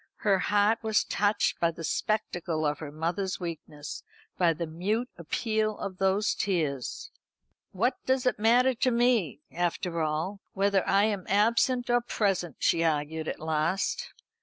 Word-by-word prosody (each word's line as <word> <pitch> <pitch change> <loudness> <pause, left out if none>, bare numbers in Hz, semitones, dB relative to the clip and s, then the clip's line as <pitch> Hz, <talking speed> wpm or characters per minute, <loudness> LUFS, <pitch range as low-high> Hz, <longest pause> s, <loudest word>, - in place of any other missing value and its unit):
Her 195 -3 +3
heart 205 +4 +2
was 220 -1 +2
touched 205 0 +1
by 170 - +3
the 165 0 -8
spectacle 175 -3 -1
of 150 0 0
her 155 -2 -6
mother's 175 +5 -2
weakness, 155 -4 -6 0.3
by 175 -2 +3
the 165 +1 -3
mute 205 +10 -2
appeal 215 +5 -1
of 190 -2 -6
those 195 +2 +2
tears. 155 - -2 0.6
"What 245 +7 -1
does 260 -1 +2
it 250 - +1
matter 245 +4 +4
to 255 +2 +1
me, 235 - +2
after 175 -1 -1
all, 160 +6 -2
whether 195 -1 +2
I 200 - +4
am 205 -4 -1
absent 235 +5 +2
or 240 0 +4
present?" 195 - -1
she 165 - +2
argued 155 0 -1
at - - -4
last. 160 +4 -1
190 Hz, 150 wpm, -28 LUFS, 165-215 Hz, 0.6 s, matter